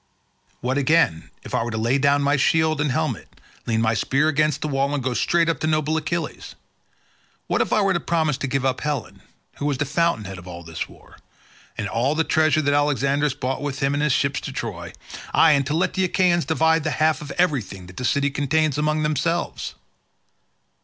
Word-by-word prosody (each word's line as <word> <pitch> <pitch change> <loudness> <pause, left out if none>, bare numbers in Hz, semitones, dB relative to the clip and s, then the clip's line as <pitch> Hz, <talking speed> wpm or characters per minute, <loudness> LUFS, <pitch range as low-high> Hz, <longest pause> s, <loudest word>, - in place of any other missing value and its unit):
What, 130 +3 0
again, 130 - +2
if - - -10
I - - +1
were 120 - -4
to 110 - -4
lay 120 +5 +1
down 140 +1 +3
my 140 +1 +3
shield 155 +2 +2
and 150 - +1
helmet, - - -3 0.3
lean 115 -1 +1
my 110 0 +2
spear 135 +7 +1
against 150 -1 +1
the - - -1
wall 140 0 0
and 135 - -3
go 130 0 -1
straight 170 +6 +2
up 165 -6 0
to 155 - -1
noble 155 0 +1
Achilles? 165 +2 -4 0.9
What - - 0
if - - -1
I 215 - +3
were 195 -1 +2
to 175 - 0
promise 160 -4 0
to 135 - -2
give 135 0 -1
up 130 - 0
Helen, 145 -6 -4 0.4
who 145 - -2
was 140 -3 0
the 145 - -1
fountainhead 140 - -1
of 90 - -13
all 85 -1 -8
this 80 -1 -5
war, - - -18 0.6
and 105 - -2
all 120 +8 0
the 160 - +2
treasure 155 0 +2
that 145 0 +2
Alexandrus 145 -1 +1
brought 130 -2 -3
with 145 -2 -3
him 140 +1 0
in 145 - 0
his 150 -1 +2
ships 140 +1 +1
to - - -6
Troy, - - -5 0.4
aye, 165 - +6
and 140 -2 +2
to 150 - -1
let 180 +3 +1
the 190 - +1
Achaeans 175 -2 +2
divide 160 0 +2
the 155 - 0
half 155 -2 +2
of 150 - -8
everything 130 - 0
that 90 0 -14
the - - -4
city 140 +3 +1
contains 145 +1 0
among 155 +1 +1
themselves? 155 +3 -1
145 Hz, 215 wpm, -23 LUFS, 130-155 Hz, 0.9 s, aye